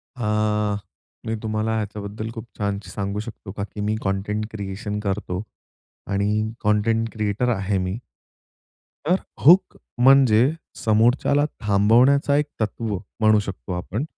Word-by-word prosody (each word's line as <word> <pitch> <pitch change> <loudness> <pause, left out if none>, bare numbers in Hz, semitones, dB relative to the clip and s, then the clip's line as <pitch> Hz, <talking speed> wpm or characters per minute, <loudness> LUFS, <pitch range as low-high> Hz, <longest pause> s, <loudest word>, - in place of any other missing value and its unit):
हां, 105 -2 0 0.5
मी 110 - -1
तुम्हाला 110 +1 -1
ह्याच्याबद्दल 105 0 -4
खूप 115 0 -7
छान 100 -1 -1
सांगू 100 +2 -4
शकतो, 110 -2 -8
का 100 0 -4
की 105 0 -7
मी 105 +1 0
कंटेंट 105 +2 -1
क्रिएशन 105 0 -4
करतो. 100 -2 -2 0.7
आणि 105 +2 0
कंटेंट 110 +2 +2
क्रिएटर 110 +2 0
आहे 95 0 -1
मी. 95 +2 -2 1.1
तर 175 +4 +4 0.3
हुक 180 +5 +6 0.2
म्हणजे 130 -2 +6 0.3
समोरच्याला 120 +6 +3
थांबवण्याचा 120 +8 +4
एक 150 - +2 0.2
तत्व 110 0 -2 0.2
म्हणू 110 -1 +5
शकतो 95 -2 -6
आपण, 95 +7 -3
105 Hz, 125 wpm, -23 LUFS, 100-115 Hz, 1.1 s, हुक